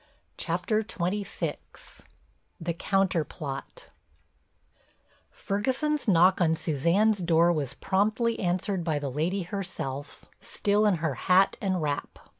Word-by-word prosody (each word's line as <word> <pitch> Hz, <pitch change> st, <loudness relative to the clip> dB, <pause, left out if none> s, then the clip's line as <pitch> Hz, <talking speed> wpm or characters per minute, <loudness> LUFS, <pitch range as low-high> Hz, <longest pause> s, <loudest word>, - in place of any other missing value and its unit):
CHAPTER 180 Hz, +5 st, -1 dB
XXVI—THE 185 Hz, -3 st, -6 dB
COUNTER 190 Hz, -1 st, +1 dB
PLOT 145 Hz, -, -7 dB, 1.4 s
Ferguson's 260 Hz, +9 st, -1 dB
knock 185 Hz, 0 st, +5 dB
on 160 Hz, -2 st, +3 dB
Suzanne's 170 Hz, +8 st, +2 dB
door 170 Hz, 0 st, +3 dB
was 140 Hz, -4 st, -3 dB
promptly 215 Hz, +6 st, 0 dB
answered 185 Hz, 0 st, -1 dB
by 160 Hz, -3 st, 0 dB
the 145 Hz, -2 st, -3 dB
lady 175 Hz, +8 st, -1 dB
herself, 170 Hz, -7 st, -5 dB
still 210 Hz, +1 st, +1 dB
in 200 Hz, -, +3 dB
her 160 Hz, -3 st, -1 dB, 0.2 s
hat 190 Hz, +2 st, +5 dB
and 185 Hz, -4 st, 0 dB
wrap. 145 Hz, -1 st, -3 dB
180 Hz, 105 wpm, -27 LUFS, 160-205 Hz, 1.4 s, knock